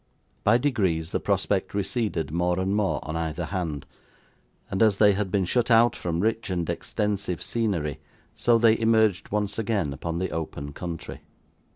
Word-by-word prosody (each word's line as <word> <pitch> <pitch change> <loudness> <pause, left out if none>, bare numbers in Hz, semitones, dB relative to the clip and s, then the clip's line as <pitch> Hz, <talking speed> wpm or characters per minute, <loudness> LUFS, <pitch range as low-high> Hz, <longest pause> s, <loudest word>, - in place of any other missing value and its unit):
By 105 +3 +5
degrees, 95 - 0
the - - 0
prospect - - 0
receded 100 -5 -1
more 90 +2 0
and 95 +2 0
more 105 -2 +1
on 80 - -5
either 80 +1 -2
hand, 80 -6 -3 0.9
and 95 - -1
as 110 -3 +4
they 105 -1 +6
had 100 0 -1
been 95 0 +1
shut 120 +6 +1
out 115 +1 +5
from 85 -1 -2
rich 110 +1 0
and 90 -3 -1
extensive 100 -4 -2
scenery, 95 - -1 0.3
so 120 -1 +3
they 115 -1 +4
emerged 110 -4 +2
once 105 +1 -1
again 100 -9 0
upon 85 +3 -4
the 95 +2 -2
open 70 -3 -5
country. 85 0 -6
95 Hz, 165 wpm, -26 LUFS, 85-110 Hz, 0.9 s, they